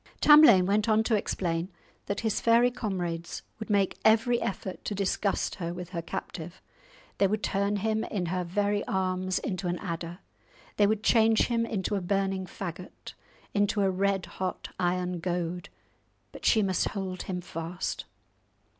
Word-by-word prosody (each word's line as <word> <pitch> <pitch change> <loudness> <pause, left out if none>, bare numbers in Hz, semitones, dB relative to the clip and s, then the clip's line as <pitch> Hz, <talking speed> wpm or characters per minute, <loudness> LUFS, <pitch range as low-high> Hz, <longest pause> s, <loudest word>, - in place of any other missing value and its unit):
Tamlane 295 -12 +8
went 210 +3 +1
on 220 0 +4
to 225 - 0
explain 175 -3 -1 0.4
that 200 - -2
his 220 -2 0
fairy 235 +2 +4
comrades 175 -8 -4 0.2
would 220 - -7
make 200 -2 +1
every 230 +2 +4
effort 190 -1 -4
to 205 - -3
disgust 200 +1 0
her 170 0 -3
with 180 -1 -7
her 170 -2 -4
captive. 165 +1 -6 0.6
They 195 - +5
would 215 +2 -2
turn 200 +1 0
him 220 +2 0
in 195 -5 -2
her 180 +2 -1
very 205 +3 0
arms 185 -3 0
into 185 -2 -3
an 175 0 -1
adder; 170 -2 -5 0.6
they 205 - +5
would 215 0 0
change 225 -1 +4
him 230 -1 +1
into 210 -2 -2
a 200 - 0
burning 195 0 -1
faggot, 180 -1 -8 0.4
into 205 0 +2
a 195 -1 +3
red 195 0 0
hot 185 0 -5
iron 180 0 0
goad, 175 0 -3 0.6
but - - -10
she 220 -2 +4
must 190 -2 +1
hold 190 -3 -4
him 180 -1 -4
fast. 170 0 -5
195 Hz, 160 wpm, -28 LUFS, 180-210 Hz, 0.6 s, Tamlane